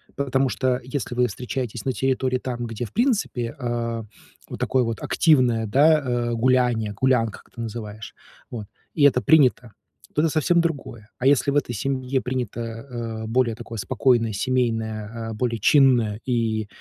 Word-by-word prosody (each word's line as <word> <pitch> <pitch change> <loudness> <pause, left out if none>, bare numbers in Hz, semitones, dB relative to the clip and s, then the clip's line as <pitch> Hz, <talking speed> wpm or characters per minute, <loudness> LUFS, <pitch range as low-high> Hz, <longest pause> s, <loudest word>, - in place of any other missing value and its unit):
Потому 135 -1 +1
что 130 0 0
если 130 -2 -4
вы 125 0 +2
встречаетесь 120 +1 -5
на 130 - 0
территории, 130 -1 0
там, 120 -2 -4
где, 115 +1 -4
в - - -11
принципе, 215 - 0
а, 115 -2 -3 0.4
вот - - -7
такое 130 -1 +1
вот 115 -1 -3
активное, 125 -8 +3
да, 150 +8 +5
а, 120 -4 -1
гуляние, 120 -3 +2
гулянка, 115 -1 +1
как - - -28
ты 120 - -7
называешь 110 -2 -7 0.3
вот, 110 -4 -6 0.3
и 150 - +2
это 130 -3 +5
принято- 130 -7 +3 0.4
то 150 - +3
это 165 - +3
совсем 170 +2 +3
другое. 140 -10 -4
А 130 - +1
если 140 0 +3
в 140 - -2
этой 125 -4 0
семье 130 +2 -1
принято, 125 -3 -3
э, 115 -1 -6
более 120 0 +1
такое 115 -1 -8
спокойное, 115 +1 +1
семейное, 115 -2 -2
а, 110 - -4
более 115 0 -1
чинное 120 -5 +4
и, 115 -4 0
120 Hz, 165 wpm, -23 LUFS, 115-130 Hz, 0.4 s, да